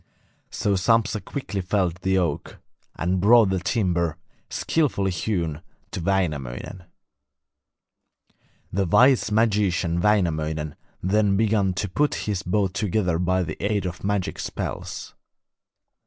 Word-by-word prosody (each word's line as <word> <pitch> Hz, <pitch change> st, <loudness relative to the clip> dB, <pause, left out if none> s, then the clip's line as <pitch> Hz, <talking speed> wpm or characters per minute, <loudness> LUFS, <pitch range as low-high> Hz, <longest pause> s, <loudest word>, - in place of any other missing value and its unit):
So 100 Hz, -, -1 dB
Sampsa 105 Hz, +2 st, +2 dB
quickly 110 Hz, -8 st, -4 dB
felled 90 Hz, -2 st, 0 dB
the 95 Hz, +1 st, 0 dB
oak, 85 Hz, -6 st, -2 dB, 0.4 s
and 90 Hz, +2 st, 0 dB
brought 110 Hz, 0 st, +6 dB
the 95 Hz, -, +1 dB
timber, 90 Hz, -4 st, 0 dB, 0.3 s
skilfully 120 Hz, -12 st, 0 dB
hewn, 85 Hz, -4 st, -2 dB, 0.3 s
to -, -, -4 dB
Wainamoinen. 85 Hz, -3 st, -2 dB, 1.9 s
The 95 Hz, 0 st, +1 dB
wise 125 Hz, +4 st, +4 dB
magician 100 Hz, -6 st, +1 dB
Wainamoinen 80 Hz, -7 st, +1 dB, 0.3 s
then 100 Hz, +1 st, +2 dB
began 105 Hz, -3 st, +2 dB
to 100 Hz, -, -1 dB
put 145 Hz, +11 st, +1 dB
his 100 Hz, -4 st, -1 dB
boat 95 Hz, 0 st, 0 dB
together 95 Hz, -4 st, 0 dB
by 90 Hz, +1 st, +1 dB
the -, -, -6 dB
aid 100 Hz, -2 st, 0 dB
of 90 Hz, -1 st, -5 dB
magic 100 Hz, -2 st, -1 dB
spells. -, -, -5 dB
95 Hz, 115 wpm, -24 LUFS, 85-105 Hz, 1.9 s, brought